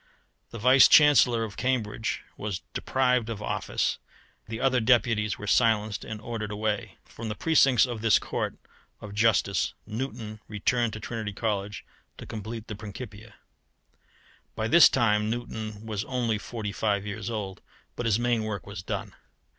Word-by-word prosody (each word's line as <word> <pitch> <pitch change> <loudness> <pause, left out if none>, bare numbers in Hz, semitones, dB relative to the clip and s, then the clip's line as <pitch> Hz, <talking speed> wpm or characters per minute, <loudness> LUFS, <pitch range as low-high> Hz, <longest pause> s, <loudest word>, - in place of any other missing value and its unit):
The - - -8
Vice 130 +4 +7
Chancellor 140 -6 +6
of 105 -3 -7
Cambridge 115 -4 -1
was 105 -3 -4
deprived 125 -3 +1
of 110 -3 -4
office, 105 - -1 0.5
the 115 0 -5
other 130 -1 +2
deputies 115 -3 +2
were 105 - -7
silenced 110 -2 +2
and 110 -1 -6
ordered 110 -1 -5
away. 105 0 -2
From 115 -1 -7
the 105 - -3
precincts 135 -8 +4
of 120 -4 -5
this 115 -2 +5
court - - -3 0.4
of 105 -1 -9
justice 105 -2 +2
Newton 110 -2 -5
returned 110 +2 0
to 110 - -6
Trinity 110 -1 -5
College 105 -1 -3 0.3
to - - -9
complete 110 +1 -6
the - - -6
Principia. 105 +1 -9 1.2
By 110 - -1
this 165 +5 +8
time 105 -4 +2
Newton 110 -2 -5
was 105 -2 -3
only 120 -4 -1
forty 110 -2 -5
five 100 -1 0
years 105 0 -5
old, 100 -4 -5 0.3
but 120 - -2
his 110 -2 +3
main 120 -1 +1
work 105 -3 -4
was 100 -3 -7
done. - - -5
110 Hz, 155 wpm, -27 LUFS, 105-120 Hz, 1.2 s, this